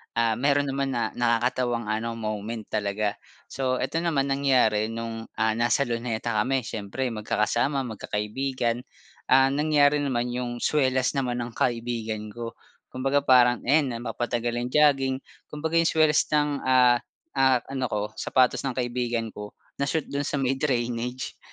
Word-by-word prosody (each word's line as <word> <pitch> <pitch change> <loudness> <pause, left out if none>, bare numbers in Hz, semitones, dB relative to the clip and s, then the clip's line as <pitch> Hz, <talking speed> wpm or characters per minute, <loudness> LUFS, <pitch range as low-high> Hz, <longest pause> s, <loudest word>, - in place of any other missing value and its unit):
ah, 115 -1 +1
meron 140 0 +2
naman 135 0 -1
na 115 -2 -1
nakakatawang 120 -1 0
ano 115 +1 -2
moment 110 0 -4
talaga. 105 0 -1 0.3
So, 130 -1 0
eto 140 +5 -1
naman, 145 -5 0
nangyari 125 -6 +3
nung, 115 0 -5
ah, 110 0 +2
nasa 120 +4 +2
Luneta 115 -1 -2
kami 125 +4 +1
siyempre 110 +4 -4
magkakasama, 110 +6 0
magkakaibigan, 120 +2 -3 0.4
ah, 135 +1 +5
nangyari 145 0 +3
naman 125 -4 -1
yung 120 -1 -4
swelas 130 -3 +2
naman 125 -3 -1
ng 120 - -7
kaibigan 115 -3 -2
ko. 115 0 -7 0.3
Kumbaga 135 +2 0
parang, 125 -3 +5
ayan 140 -1 +3
napapatagal 120 0 -2
ang 120 +1 -3
jogging 135 -3 +4 0.4
kumbaga 160 +2 -3
yung 165 0 +4
swelas 155 -2 +4
ng 150 -1 +1
ah, 125 -2 +5 0.3
ah, 130 -2 +3
ano 130 -2 -1
ko, 105 -1 -2 0.2
sapatos 130 -1 +2
ng 130 - -3
kaibigan 120 -2 -2
ko, 105 0 -9 0.2
na 140 - 0
shoot 160 0 0
dun 140 0 -2
sa - - -2
may 135 -1 0
drainage, 125 -2 -2
125 Hz, 150 wpm, -26 LUFS, 115-135 Hz, 0.4 s, ah